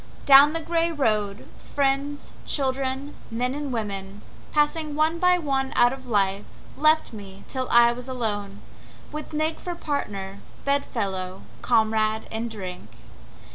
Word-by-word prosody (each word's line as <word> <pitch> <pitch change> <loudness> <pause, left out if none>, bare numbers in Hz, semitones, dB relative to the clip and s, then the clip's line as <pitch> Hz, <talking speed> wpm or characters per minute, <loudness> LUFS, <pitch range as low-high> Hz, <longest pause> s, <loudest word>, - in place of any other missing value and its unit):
Down 280 +2 +8
the 330 - -2
gray 335 +1 +1
road, 215 -9 0 0.3
friends, 280 +1 0
children, 270 0 -1 0.2
men 245 +3 -1
and 290 -1 -4
women, 200 -3 -4 0.3
Passing 300 0 +1
one 315 +2 +1
by 360 0 +5
one 270 -5 -1
out 245 +1 +5
of 260 -1 -10
life, 200 -3 +1 0.3
left 310 -2 +3
me 200 -2 -10
till 260 -1 -3
I 235 0 +6
was 250 +1 -7
alone 205 -6 -3 0.5
With 305 0 -6
Nig 310 +1 -1
for 350 -1 -5
partner, 200 - -4 0.3
bed 280 0 +2
fellow; 190 -5 -4 0.2
comrade 220 -2 +2
in 225 +1 -2
drink. 185 - -7
255 Hz, 135 wpm, -25 LUFS, 210-290 Hz, 0.5 s, Down